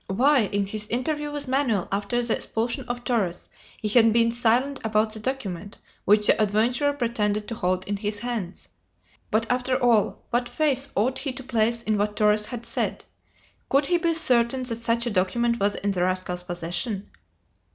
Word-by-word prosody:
Why, 255 +4 +3
in 200 -1 0
his 210 +1 -4
interview 295 +5 -1
with 290 -2 -5
Manoel 255 -7 +1
after 205 +5 0
the 235 - +1
expulsion 235 +1 -2
of 245 0 -4
Torres, 210 -7 -1 0.3
had 210 - 0
he - - +6
been 230 +1 +3
silent 245 +4 +1
about 215 0 +1
the 220 - -5
document 205 -6 -4 0.3
which 210 +1 +4
the - - +4
adventurer 230 +7 +2
pretended 215 -5 -1
to - - -4
hold 185 -3 -1
in 205 0 -1
his 210 +1 -2
hands? 220 -6 -4 0.6
But, 220 +1 +1
after 255 +1 +1
all, 235 -5 +2
what 245 0 0
faith 275 -3 +1
ought 255 +6 +1
he 275 0 -2
to 265 +1 -8
place 235 -1 0
in 215 -1 0
what 210 0 0
Torres 210 0 +2
had 240 -2 -6
said? - - -3 0.6
Could 275 +1 +3
he 350 +3 +2
be 335 -1 +1
certain 255 -4 +2
that 235 -3 -3
such 230 +1 0
a 240 - -1
document 235 +5 +1
was 200 +1 +1
in 205 - -1
the 185 -2 -1
rascal's 185 -1 -1
possession? 180 +4 -3
230 Hz, 185 wpm, -25 LUFS, 205-250 Hz, 0.6 s, he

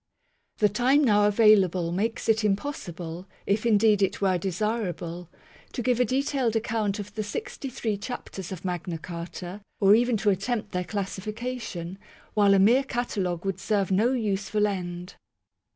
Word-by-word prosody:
The 210 - +4
time 250 +8 +3
now 210 -5 +4
available 195 -5 +4
makes 220 +6 -2
it 220 0 +3
impossible, 185 - -3 0.2
if 215 +3 +1
indeed 210 -2 +4
it 195 - +1
were 190 -3 +2
desir 210 +4 -1
able, 175 0 -6 0.4
to 245 - -3
give 250 -1 +2
a 250 - +4
detailed 260 -1 0
account 220 -2 0
of 205 0 -7
the 215 - -3
sixty 215 +6 -5
three 220 -4 -2
chapters 195 -5 -6
of 185 -1 -7
Magna 175 -1 -3
Carta 175 +3 -7 0.2
or 200 0 +6
even 240 +1 +3
to 205 0 +2
attempt 205 +2 -2
their 180 0 -2
classification; 205 -1 -5 0.3
while 200 -2 +5
a - - +5
mere 235 +8 +5
catalogue 200 -9 -2
would 195 -1 -2
serve 200 -2 0
no 215 +6 +3
useful 210 -3 0
end. 180 -3 -4
205 Hz, 155 wpm, -26 LUFS, 185-225 Hz, 0.4 s, or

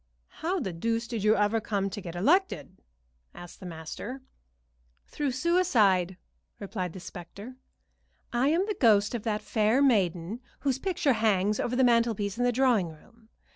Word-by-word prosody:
"How 360 +4 0
the 190 - -3
deuce 230 +7 -2
did 230 -4 -4
you 215 +1 +4
ever 210 +2 +1
come 200 -2 -1
to 205 - -6
get 175 -2 -8
elected?" 305 - +1 0.5
asked 175 -1 -11
the 185 - -8
master. 170 - -7 0.8
"Through 295 - -3
a - - +1
suicide," 230 - +2 0.4
replied 185 -4 -4
the 185 - -8
specter. 200 +7 -10 0.8
"I 245 +3 +2
am 335 +6 +2
the 425 - -2
ghost 215 - +3
of 240 - -2
that 215 -1 -1
fair 220 +4 +2
maiden 200 -6 +1 0.2
whose 270 -2 0
picture 335 -5 +1
hangs 210 -2 +1
over 245 - -1
the 260 - +3
mantelpiece 230 -3 +2
in - - +2
the 245 - +3
drawing 240 -8 +2
room. 220 +8 -18
220 Hz, 165 wpm, -28 LUFS, 195-255 Hz, 0.8 s, you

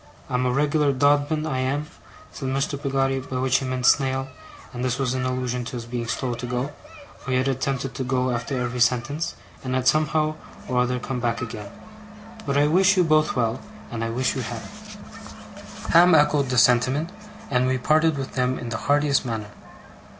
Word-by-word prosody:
I'm 125 0 +1
a - - +1
reg'lar 145 +1 +2
Dodman, 145 +3 +2
I 130 -4 -2
am,' 135 +3 -1 0.5
said 135 -3 -5
Mr. 135 +2 -1
Peggotty, 135 -1 0
by 130 -1 -5
which 130 0 +2
he 135 - -4
meant 130 -1 -2
snail, 135 0 +2 0.4
and 125 0 -4
this 125 -1 0
was 130 -2 0
in 130 0 -1
allusion 125 -1 -2
to - - -6
his 120 -2 -5
being 120 0 -4
slow 125 +1 -2
to 125 +1 -5
go, 125 +3 -2 0.5
for - - -9
he 130 - +2
had 130 +1 +1
attempted 135 0 -2
to 130 - -3
go 130 0 0
after 120 +2 -2
every 125 0 -3
sentence, 135 +7 +1 0.3
and 130 -1 -2
had 130 0 0
somehow 155 +2 +2 0.3
or 125 -1 0
other 125 0 +1
come 125 +1 -4
back 120 -1 -1
again; 105 -4 -6 0.8
'but 140 0 +1
I 145 - +4
wish 190 +5 +4
you 180 - +5
both 155 -1 +2
well, 115 -1 0 0.3
and 115 -1 -3
I 115 - -2
wish 125 +3 0
you 130 - -2
happy!' 115 - -6 1.2
Ham 175 0 +7
echoed 150 -2 +3
this 125 -3 +5
sentiment, 130 +7 +2 0.4
and 125 -1 +2
we 130 0 +1
parted 155 +4 +2
with 135 -1 -5
them 125 0 0
in 120 - -6
the 110 - -2
heartiest 145 -1 +3
manner. 110 -4 -4
130 Hz, 195 wpm, -24 LUFS, 125-145 Hz, 1.2 s, Ham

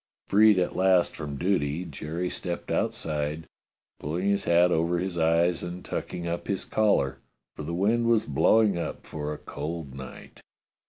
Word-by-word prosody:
Freed 105 0 +6
at 90 - 0
last 95 -1 +3
from 75 -3 -5
duty, 85 -2 0
Jerry 85 +2 -4
stepped 90 -1 -4
outside, 75 +1 -1 0.5
pulling 85 +7 -2
his 100 0 +1
hat 85 +1 +4
over 85 +2 +1
his 90 0 -2
eyes 85 +1 +2
and 85 +1 -6
tucking 85 - -4
up 85 +1 -3
his 100 -2 -2
collar, 105 -11 +1 0.4
for - - -7
the 80 +3 -4
wind 115 +6 +2
was 115 -2 +3
blowing 110 -5 +3
up - - -5
for 75 -1 -5
a 75 - -4
cold 80 -4 -6
night. 65 0 -10
85 Hz, 160 wpm, -27 LUFS, 80-95 Hz, 0.5 s, Freed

